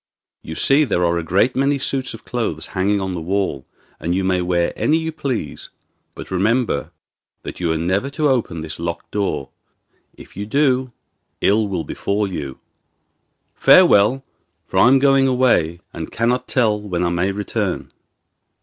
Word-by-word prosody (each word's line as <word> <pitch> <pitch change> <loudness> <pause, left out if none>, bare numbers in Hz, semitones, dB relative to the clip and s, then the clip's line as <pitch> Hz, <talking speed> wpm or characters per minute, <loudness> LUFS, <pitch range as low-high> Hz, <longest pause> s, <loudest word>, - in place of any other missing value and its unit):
You 80 - -8
see 140 - +3
there 90 -10 +1
are 85 0 +1
a - - -4
great 100 +9 +2
many 140 +2 +2
suits 135 -1 -2
of - - -15
clothes 110 -11 -3
hanging 100 +2 +1
on 95 -1 -3
the 85 - -4
wall, 90 -6 -2 0.3
and 85 +2 -1
you 95 - 0
may 95 -1 +1
wear 90 -1 0
any 155 - +2
you 160 0 -3
please; 130 - -4 0.5
but - - -9
remember 110 - 0 0.5
that - - -7
you 85 -2 0
are 80 - 0
never 95 +10 0
to 155 - +2
open 120 - 0
this 80 0 -6
locked 85 0 -5
door. 100 -9 -2 0.7
If - - -14
you 100 +2 -5
do 130 0 +1 0.5
ill 105 +2 +3
will 95 -4 -3
befall 100 +7 -2
you. 70 -8 -6 1.0
Farewell, 110 +7 +5 0.4
for - - -1
I - - +7
am 135 +2 +6
going 135 0 +4
away 125 -9 +3
again 85 +2 -10
and 80 -1 -6
cannot 120 +3 0
tell 110 -5 +1
when 90 -4 -2
I 85 - +1
may 85 +3 0
return. 100 0 -3
100 Hz, 170 wpm, -20 LUFS, 85-130 Hz, 1.0 s, I